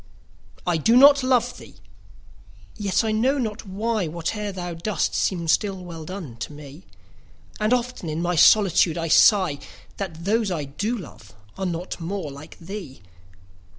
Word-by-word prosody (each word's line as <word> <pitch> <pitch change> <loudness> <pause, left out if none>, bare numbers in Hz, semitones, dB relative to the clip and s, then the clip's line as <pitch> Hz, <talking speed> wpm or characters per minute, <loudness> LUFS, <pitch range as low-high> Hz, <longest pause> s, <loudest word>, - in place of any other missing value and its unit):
I 175 -2 +1
do 225 +10 +3
not 280 +1 +8
love 245 -1 +1
thee!—yet, 95 - -7
I 220 - 0
know 250 +6 +2
not 220 -4 -4
why, 210 0 -1
5 155 - -8
Whate'er 205 +5 -3
thou 175 -2 -5
dost 170 +2 -2
seems 170 -4 0
still 195 -3 0
well 165 -2 -8
done, 170 -10 -7
to 115 - -6
me: 150 +3 -12 0.7
And 215 +1 +1
often 250 -8 -1
in 155 +1 -3
my 175 +1 0
solitude 180 -2 +5
I 165 -1 -2
sigh 180 -4 +5 0.4
That 170 -4 -6
those 215 +1 +1
I 165 -5 -2
do 205 - -3
love 110 - -12 0.2
are 190 -1 -3
not 175 +2 -5
more 170 -3 -4
like 140 +3 -12
thee! 175 - -9
180 Hz, 155 wpm, -23 LUFS, 155-215 Hz, 0.7 s, not